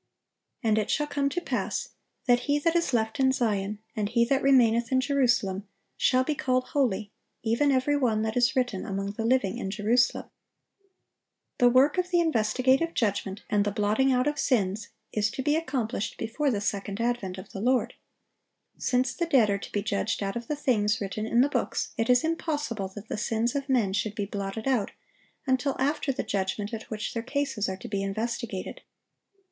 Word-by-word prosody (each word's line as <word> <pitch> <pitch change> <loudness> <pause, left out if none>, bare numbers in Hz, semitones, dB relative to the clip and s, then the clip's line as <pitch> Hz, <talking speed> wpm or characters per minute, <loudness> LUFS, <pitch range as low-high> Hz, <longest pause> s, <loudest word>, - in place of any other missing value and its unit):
And 220 -1 +3
it 215 - -2
shall 295 - +1
come 285 -1 0
to 355 - -2
pass, - - -2 0.4
that 245 -2 +4
he 290 - +4
that 330 +3 +1
is 340 -4 +2
left 220 -1 0
in 265 -1 +4
Zion, 210 -5 -1 0.2
and 210 -1 -1
he 235 0 +3
that 270 +2 +1
remaineth 235 -3 +4
in 260 - +4
Jerusalem, 240 -8 +1 0.3
shall 255 0 +3
be 305 - -1
called 255 -3 0
holy, 215 -7 0 0.3
even 235 +6 +2
every 265 +2 +2
one 230 -6 +1
that 220 0 -2
is 245 -1 +3
written 245 -7 0
among 195 -2 -3
the 215 +2 -4
living 235 -3 +1
in 195 - -3
Jerusalem."(865) 225 +4 +1 1.3
The 245 - +6
work 270 +8 +4
of 360 0 -1
the 350 -1 +3
investigative 260 +2 +2
judgment 200 -3 -1
and 205 -1 +2
the 205 - 0
blotting 215 +6 +2
out 250 0 +2
of 295 0 -1
sins 205 -4 +1 0.3
is 215 0 +1
to 260 +3 -5
be 295 +2 +2
accomplished 255 -9 -2
before 285 +6 -1
the 210 -6 -1
second 200 0 -3
advent 230 -6 -1
of 185 - -10
the 195 -4 -6
Lord. 250 +2 +1 0.9
Since 250 -1 +1
the 340 - -2
dead 245 -10 +4
are 200 - 0
to - - -9
be 205 - -1
judged 205 +1 -1
out 195 0 -3
of 235 -1 -5
the 300 - -1
things 220 -7 +1
written 215 +2 -3
in 235 +2 +3
the 270 - +4
books, - - -2
it 225 +2 -1
is 250 0 +5
impossible 295 - -2
that 205 +1 -9
the - - -4
sins 230 +1 0
of 280 0 -3
men 225 -7 +2
should 210 +1 -1
be 205 -3 -2
blotted 200 +3 -4
out 245 -7 +1 0.6
until 260 +1 +1
after 280 +1 0
the 255 - -3
judgment 200 +2 -2
at 220 -1 -6
which 215 -1 -4
their 230 - -2
cases 265 -4 -2
are 190 - -4
to - - -9
be 200 -1 -2
investigated. 220 - -4
235 Hz, 195 wpm, -27 LUFS, 210-265 Hz, 1.3 s, The